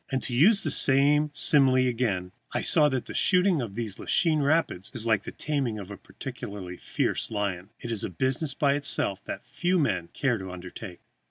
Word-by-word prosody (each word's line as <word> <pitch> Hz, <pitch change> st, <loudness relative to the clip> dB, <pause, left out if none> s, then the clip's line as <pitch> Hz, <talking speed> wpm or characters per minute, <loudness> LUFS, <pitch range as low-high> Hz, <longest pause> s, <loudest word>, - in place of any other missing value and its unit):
And, 130 Hz, -2 st, -3 dB
to 125 Hz, -, -5 dB
use 200 Hz, -, +4 dB
the 155 Hz, -, 0 dB
same 145 Hz, +3 st, +5 dB
simile 135 Hz, -1 st, +4 dB
again, 110 Hz, -7 st, -2 dB, 0.2 s
I -, -, -2 dB
saw 150 Hz, -1 st, +4 dB
that 130 Hz, -3 st, -3 dB
the -, -, -9 dB
shooting 180 Hz, -4 st, +2 dB
of 110 Hz, -5 st, -7 dB
these 110 Hz, -4 st, -5 dB
Lachine 160 Hz, -4 st, +1 dB
Rapids 140 Hz, -, 0 dB
is 110 Hz, -, +1 dB
like 110 Hz, -3 st, 0 dB
the -, -, -6 dB
taming 135 Hz, -7 st, -3 dB
of 100 Hz, -1 st, -9 dB
a -, -, -7 dB
particularly 95 Hz, -2 st, -9 dB
fierce -, -, -2 dB
lion; 100 Hz, -3 st, -4 dB
it 120 Hz, -, -7 dB
is 110 Hz, -4 st, +1 dB
a -, -, -3 dB
business 130 Hz, -, -1 dB
by 140 Hz, -2 st, +1 dB
itself 140 Hz, -9 st, 0 dB
that -, -, -7 dB
few 175 Hz, +7 st, -1 dB
men 100 Hz, -, -1 dB
care 120 Hz, -, -2 dB
to 95 Hz, 0 st, -8 dB
undertake. 90 Hz, +1 st, -10 dB
125 Hz, 195 wpm, -26 LUFS, 100-145 Hz, 0.2 s, same